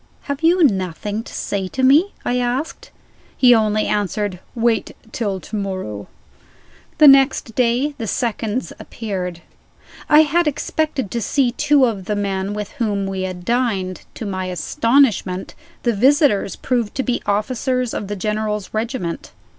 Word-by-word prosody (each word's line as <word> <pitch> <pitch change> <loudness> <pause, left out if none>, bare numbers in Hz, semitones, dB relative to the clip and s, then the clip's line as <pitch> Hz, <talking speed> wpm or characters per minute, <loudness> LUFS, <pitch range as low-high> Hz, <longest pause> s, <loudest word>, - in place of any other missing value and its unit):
"Have 280 +1 -4
you 340 +2 +4
nothing 200 - 0
to - - -12
say 195 -2 -3
to 260 +7 -3
me?" 300 +10 +5
I 250 +1 +1
asked. 250 +6 -3 0.5
He 250 -2 +7
only 215 -2 +2
answered: 205 -2 -1 0.2
"Wait 230 -2 0 0.2
till 200 -5 -2
to 215 - -8
morrow." 185 - -4 0.9
The 305 - +8
next 270 -4 +5
day 250 +5 +1
the 225 - -3
seconds 235 0 -2
appeared. 180 -6 -5 0.7
I 300 +1 +8
had 330 +2 +1
expected 295 -5 -2
to 235 - -2
see 255 +2 +1
two 290 +1 +3
of 205 -6 -3
the 210 - -1
men 200 0 -2
with 210 -1 -5
whom 210 -8 -1
we 195 -1 -3
had 185 -1 -5
dined. 220 -7 -1
To 225 - -6
my 185 -2 -3
astonishment, 195 - +1 0.3
the 235 - +2
visitors 260 - +3
proved 240 -5 -2
to 265 - 0
be 245 -2 -1
officers 250 +4 0
of 205 - -4
the 205 - -3
General's 210 0 -2
regiment. 220 -6 -3
220 Hz, 150 wpm, -20 LUFS, 195-260 Hz, 0.9 s, The